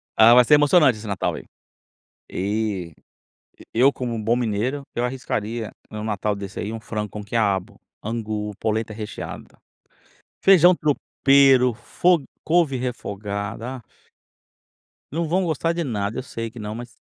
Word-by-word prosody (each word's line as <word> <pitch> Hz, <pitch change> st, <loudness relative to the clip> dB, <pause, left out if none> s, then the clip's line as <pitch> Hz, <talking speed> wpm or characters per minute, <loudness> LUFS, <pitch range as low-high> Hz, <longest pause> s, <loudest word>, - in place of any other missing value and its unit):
Ah, 115 Hz, +2 st, +8 dB
vai 125 Hz, 0 st, +8 dB
ser 150 Hz, -, +4 dB
emocionante 145 Hz, -4 st, +5 dB
esse 105 Hz, 0 st, -9 dB
Natal 100 Hz, -2 st, -1 dB
aí, -, -, -8 dB, 0.9 s
e 100 Hz, -3 st, -2 dB, 0.8 s
e 115 Hz, -, +1 dB
eu 140 Hz, +2 st, +6 dB
como 120 Hz, -2 st, -4 dB
um 110 Hz, -, -4 dB
bom 115 Hz, +3 st, +2 dB
mineiro, 125 Hz, +4 st, -1 dB
eu 120 Hz, -, -1 dB
arriscaria 115 Hz, -3 st, -3 dB, 0.2 s
em 110 Hz, -, -8 dB
um 105 Hz, -, -5 dB
Natal 105 Hz, -1 st, -1 dB
desse 100 Hz, 0 st, -6 dB
aí 105 Hz, -, -4 dB
um 115 Hz, -, -4 dB
frango 105 Hz, -1 st, -4 dB
com 105 Hz, -1 st, -7 dB
quiabo, 100 Hz, -2 st, 0 dB, 0.3 s
angu, 110 Hz, -2 st, -3 dB
polenta 110 Hz, 0 st, -1 dB
recheada, 110 Hz, 0 st, -8 dB, 0.8 s
feijão 180 Hz, -2 st, +7 dB
tropeiro, 135 Hz, -4 st, +3 dB
fo 170 Hz, +8 st, +2 dB, 0.2 s
couve 160 Hz, -5 st, +2 dB
refogada, 105 Hz, 0 st, -4 dB
aff. 120 Hz, -, -14 dB, 1.3 s
Não 165 Hz, -1 st, -1 dB
vão 185 Hz, +3 st, +1 dB
gostar 165 Hz, +1 st, 0 dB
de 170 Hz, 0 st, -2 dB
nada, 105 Hz, -3 st, -2 dB
eu 130 Hz, -, -5 dB
sei 115 Hz, -3 st, -5 dB
que 120 Hz, -, -11 dB
não, 105 Hz, 0 st, -5 dB
mas 120 Hz, 0 st, -8 dB
115 Hz, 155 wpm, -23 LUFS, 105-135 Hz, 1.3 s, Ah